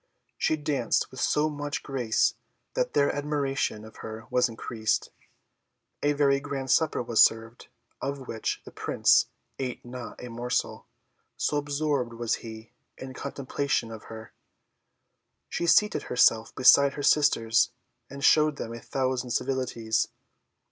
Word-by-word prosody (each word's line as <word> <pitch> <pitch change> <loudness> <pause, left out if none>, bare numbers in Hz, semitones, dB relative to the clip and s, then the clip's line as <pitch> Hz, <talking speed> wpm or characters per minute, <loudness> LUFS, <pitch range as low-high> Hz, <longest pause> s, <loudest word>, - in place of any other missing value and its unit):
She - - +1
danced 145 -5 0
with 130 - -9
so 150 +3 +2
much 145 -1 -4
grace 125 -5 +1 0.4
that - - -1
their 140 - +3
admiration 140 -6 -1
of 110 - -14
her 110 0 -8
was 125 -1 +3
increased. 110 -1 -2 0.9
A 145 0 +2
very 140 -1 +3
grand 140 -2 -4
supper 155 -5 +2
was 115 -2 +5
served, 115 +1 0 0.3
of 135 -1 -4
which 110 - -3
the - - -10
Prince - - +3 0.3
ate 125 -3 -4
not 120 0 -8
a 125 - -8
morsel, 120 +1 -2 0.5
so 150 - 0
absorbed 145 -4 -1
was 115 -1 -1
he 110 -1 -10 0.3
in 130 0 -8
contemplation 140 -3 -2
of 110 -1 -9
her. 110 0 -10 1.2
She 170 - -2
seated 210 +5 +4
herself 115 -2 +3
beside 140 +2 +6
her 145 - -5
sisters, 120 -7 +3 0.4
and 140 +1 -8
showed 155 0 +5
them 115 -4 -6
a 115 - -7
thousand 130 0 -2
civilities. 120 -3 -1
130 Hz, 135 wpm, -27 LUFS, 115-145 Hz, 1.2 s, beside